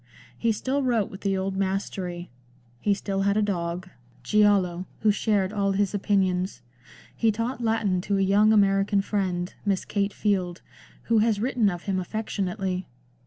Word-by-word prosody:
He 230 - +1
still 265 +6 -1
wrote 235 -6 +1
with 195 - -10
the 195 -1 0
old 190 0 -2
mastery; 190 -3 -3 0.5
he 200 +9 +2
still 195 -1 -2
had 200 +1 +2
a - - +3
dog, 175 -2 -2 0.4
Giallo, 195 -4 +2
who 215 - +4
shared 205 -2 0
all 200 -2 +1
his 200 0 0
opinions; 190 -2 0 0.5
he 225 -1 +2
taught 230 +4 -3
Latin 220 -5 +1
to 200 +2 0
a - - +1
young 205 +3 +4
American 200 -1 +3
friend. 185 -3 -2
Miss 195 -2 0
Kate 200 -1 -1
Field, 185 -5 -1 0.4
who 230 -1 +3
has 215 -1 +2
written 235 -2 +2
of 175 -2 -5
him 190 -2 -1
affectionately. 190 -2 -3
200 Hz, 160 wpm, -26 LUFS, 190-210 Hz, 0.5 s, who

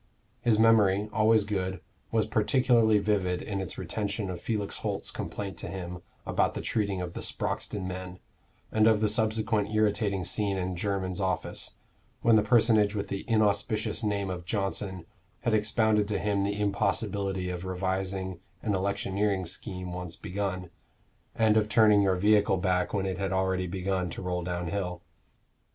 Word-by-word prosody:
His 115 -3 +3
memory, 105 -3 +4
always 110 -1 +4
good, 95 -3 -2 0.3
was 110 -2 +2
particularly 115 -1 +3
vivid 100 -3 0
in 100 -2 -3
its 95 - -6
retention 100 -2 -3
of 85 -1 -6
Felix 105 -3 -2
Holt's - - -2
complaint 100 -2 -5
to - - -5
him 90 -1 -6 0.2
about - - +1
the - - -3
treating 100 -4 -1
of 90 -1 -5
the - - -5
Sproxton 100 -3 -2
men, 90 0 -6 0.5
and 110 0 +4
of 110 -2 +4
the 110 - +2
subsequent 110 -1 +1
irritating 105 -2 +1
scene 100 +2 +1
in 90 0 -2
Jermyn's 95 0 -2
office, 95 -2 -2 0.5
when 115 -1 +6
the 110 - +6
personage 110 -1 +4
with 100 -1 -3
the 100 - -4
inauspicious 110 0 +1
name 100 -2 -1
of 90 -1 -5
Johnson 95 -2 -2 0.4
had 115 - 0
expounded 110 -1 +2
to 105 -1 0
him 100 -1 0
the 100 +1 -1
impossibility 100 -2 0
of 90 0 -5
revising 95 0 -2 0.2
an 105 - 0
electioneering 100 0 0
scheme 90 0 -5
once 90 -1 -5
begun, 95 -2 -4 0.6
and 110 -1 +3
of 105 -1 +2
turning 105 -2 +5
your 95 -2 +3
vehicle 105 +1 +3
back 90 0 +1
when 100 -2 -1
it 95 0 -3
had 95 -1 -1
already 95 -1 0
begun 95 0 -2
to 85 - -6
roll 90 -1 -1
downhill. 90 +1 -3
100 Hz, 160 wpm, -28 LUFS, 95-105 Hz, 0.6 s, when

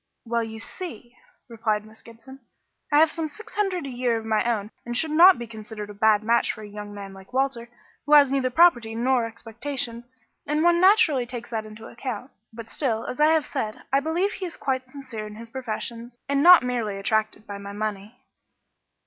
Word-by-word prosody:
"Well, 235 0 0
you 220 0 -7
see," 240 - -7 0.3
replied 215 -3 -2
Miss 220 0 -15
Gibson, 235 +4 -14 0.5
"I 290 - +4
have 315 0 +5
some 325 -2 -3
six 435 +9 -11
hundred 385 -6 -1
a - - -5
year 245 -2 0
of 220 - -6
my 220 -1 +1
own 210 -1 -3
and 240 0 -3
should 315 +3 0
not 350 +4 +8
be 240 - -6
considered 215 -2 -8
a - - -10
bad 210 0 +3
match 230 +2 +2
for 215 - -10
a - - -8
young 205 0 -8
man 200 -1 -8
like 195 +5 -15
Walter, 260 -3 -1 0.4
who 300 - +3
has 285 -3 +7
neither 270 -2 +1
property 245 -6 +4
nor 245 0 +1
expectations, 235 +1 -4 0.4
and 300 +2 +1
one 345 0 +4
naturally 340 - +4
takes 240 -1 -8
that 220 -2 -3
into 215 +1 -11
account. 250 +1 -6 0.2
But 225 0 -9
still, 230 -4 -1
as 250 - -6
I 300 - +6
have 315 -1 +3
said, 220 -7 -4
I 275 - +5
believe 335 +7 0
he 375 - -5
is 335 - -10
quite 260 -2 -2
sincere 260 -6 -7
in 210 - -10
his 230 +1 -10
professions 235 -1 -5
and 280 0 +1
not 355 0 +9
merely 235 -5 -2
attracted 215 +2 -1
by 200 -1 -7
my 200 0 -8
money." 210 +2 -5
235 Hz, 205 wpm, -25 LUFS, 220-280 Hz, 0.5 s, not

